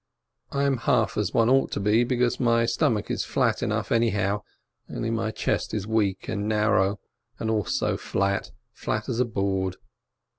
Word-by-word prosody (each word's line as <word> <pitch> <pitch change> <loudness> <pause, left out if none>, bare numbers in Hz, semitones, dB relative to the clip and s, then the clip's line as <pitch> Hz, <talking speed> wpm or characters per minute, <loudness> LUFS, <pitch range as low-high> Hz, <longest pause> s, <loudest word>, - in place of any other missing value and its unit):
I 140 0 0
am 140 -2 +2
half 110 -3 +1
as 105 -3 0
one 115 -2 +3
ought 135 +2 +3
to - - -1
be, 105 +4 +3
because 120 0 0
my 115 -2 +3
stomach 115 -2 0
is - - -1
flat - - 0
enough - - -1
anyhow, 105 -3 +1 0.5
only 115 - -3
my 115 -1 -1
chest 110 - -2
is 105 -2 -2
weak 105 -3 0
and 105 -1 -2
narrow 105 -2 +2 0.4
and 110 - -2
also 105 -3 0
flat 100 0 -1
— - - -51
flat 110 +2 -2
as 120 -1 -1
a 125 - +3
board. 95 -4 -1
110 Hz, 175 wpm, -25 LUFS, 100-115 Hz, 0.5 s, one